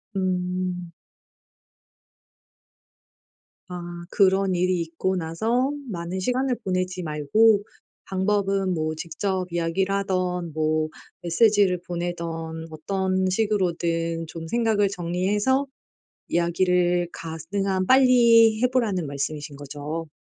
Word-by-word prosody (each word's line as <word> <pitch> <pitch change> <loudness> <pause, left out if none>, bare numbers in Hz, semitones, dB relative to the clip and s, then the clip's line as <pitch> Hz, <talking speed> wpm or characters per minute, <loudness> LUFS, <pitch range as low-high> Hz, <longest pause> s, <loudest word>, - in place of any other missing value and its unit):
음. 180 -1 -2 2.8
아 180 -1 -6 0.3
그런 195 -1 +3
일이 180 0 +1
있고 170 +3 -2
나서 220 - 0 0.2
많은 175 0 -4
시간을 250 +5 0
보내지 185 -1 -2
말고 200 +8 +3 0.4
방법은 195 0 0
뭐 155 -1 -2
직접 185 +4 -2
이야기를 175 +3 0
하든 185 -4 -1
뭐 155 0 0 0.3
메시지를 195 +1 +3
보내든 175 0 -3 0.5
어떤 185 +3 -1
식으로든 170 -5 0
좀 165 0 -7
생각을 220 0 +2
정리해서 200 +9 0 0.6
이야기를 175 0 +2
가능한 185 +4 -2
빨리 235 -4 +6
해 250 - +5
보라는 215 -9 0
말씀이신 145 +1 -4
거죠? 145 +3 -6
185 Hz, 215 characters per minute, -24 LUFS, 170-200 Hz, 2.8 s, 빨리